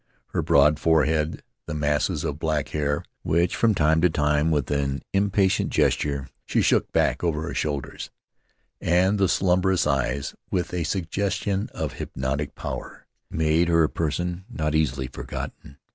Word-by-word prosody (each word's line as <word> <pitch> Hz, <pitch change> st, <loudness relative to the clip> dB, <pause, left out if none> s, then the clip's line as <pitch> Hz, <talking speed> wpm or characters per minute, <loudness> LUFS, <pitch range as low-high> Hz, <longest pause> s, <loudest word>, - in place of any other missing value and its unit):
Her -, -, -1 dB
broad 75 Hz, +2 st, +4 dB
forehead, 80 Hz, -1 st, +2 dB, 0.2 s
the 75 Hz, -, -4 dB
masses 75 Hz, -1 st, 0 dB
of 75 Hz, +1 st, -3 dB
black 80 Hz, -3 st, -1 dB
hair 75 Hz, -1 st, -1 dB, 0.2 s
which 85 Hz, +3 st, +1 dB
from 115 Hz, -3 st, +3 dB
time 80 Hz, -1 st, +3 dB
to 90 Hz, -, +5 dB
time, 75 Hz, 0 st, +1 dB
with 75 Hz, -4 st, 0 dB
an 70 Hz, -1 st, -1 dB
impatient 100 Hz, 0 st, +2 dB
gesture, 70 Hz, -2 st, +1 dB, 0.2 s
she -, -, +2 dB
shook -, -, +2 dB
back -, -, +1 dB
over 80 Hz, -3 st, 0 dB
her 85 Hz, -, -4 dB
shoulders, 70 Hz, -3 st, -3 dB, 0.7 s
and 95 Hz, +4 st, +2 dB
the 95 Hz, -2 st, +3 dB
slumberous 95 Hz, 0 st, +2 dB
Marooned 70 Hz, -2 st, +2 dB
on 65 Hz, -, +1 dB
Mataora -, -, -2 dB
eyes, 70 Hz, -, -6 dB
with 90 Hz, -2 st, -2 dB
a 90 Hz, -2 st, -1 dB
suggestion 100 Hz, +3 st, -1 dB
of -, -, -3 dB
hypnotic 65 Hz, +3 st, -3 dB
power, -, -, -6 dB, 0.2 s
made 80 Hz, +2 st, +2 dB
her 85 Hz, -1 st, +4 dB
a 75 Hz, -, +2 dB
person 85 Hz, +3 st, -2 dB
not 75 Hz, -9 st, -2 dB
easily 70 Hz, -4 st, +1 dB
forgotten. 70 Hz, +3 st, -7 dB
80 Hz, 160 wpm, -25 LUFS, 75-90 Hz, 0.7 s, to